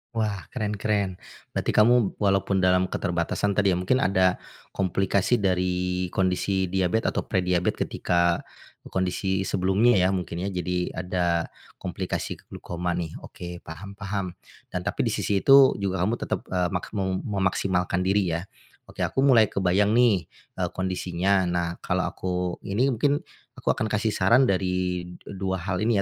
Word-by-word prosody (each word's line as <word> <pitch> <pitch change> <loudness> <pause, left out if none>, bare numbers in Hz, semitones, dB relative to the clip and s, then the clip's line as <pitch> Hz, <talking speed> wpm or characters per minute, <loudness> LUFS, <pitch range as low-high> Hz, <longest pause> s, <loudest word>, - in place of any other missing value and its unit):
Wah, 105 -5 -1
keren 105 -4 -2
keren, 100 -2 0 0.4
berarti - - 0
kamu, 115 -1 +4
walaupun 100 -1 +2
dalam 90 0 +3
keterbatasan 90 +3 -1
tadi 100 -2 +3
ya, 90 - 0
mungkin 130 +9 +1
ada, 95 -1 +3 0.4
komplikasi 95 +4 +1
dari 90 -1 0
kondisi 95 0 0
diabet 95 +4 0
atau - - -1
prediabet, 90 -2 +1
ketika 85 0 +1 0.5
kondisi 95 +1 -1
sebelumnya 95 +6 +3
ya, 95 0 +3
mungkin 90 -1 -3
ya, 100 - -2
jadi 90 0 -2
ada 90 -2 0 0.3
komplikasi - - -4
glaukoma 90 0 -4
nih. 85 -2 -3
Oke, 85 0 -9
paham 95 +5 -9
paham. 100 -3 -4 0.3
Dan 90 - -4
tapi 105 +4 -1
di 115 - 0
sisi 100 -1 0
itu 135 +4 +7
juga 95 -2 -1
kamu 110 +5 0
tetap, - - -3
eee, 90 -1 0
maksmum 95 0 -2
memaksimalkan 90 -2 0
diri 95 -3 +1
ya? 85 - -3 0.5
Oke, - - -1
aku 135 - 0
mulai 115 -6 +6
kebayang 100 +3 +2
nih, 110 -9 +3 0.3
eee, - - +1
kondisinya. 95 0 0
Nah, 85 -1 -2
kalau 90 +1 -1
aku 90 -1 -3
ini 125 +8 +2
mungkin, 145 +5 +1 0.3
aku - - 0
akan 110 - -1
kasih 105 +1 0
saran 115 +7 +4
dari, 90 -4 0
eee, 90 +3 -11
2 95 -1 -1
hal 90 0 -3
ini 115 +2 +2
95 Hz, 150 wpm, -25 LUFS, 90-100 Hz, 0.5 s, itu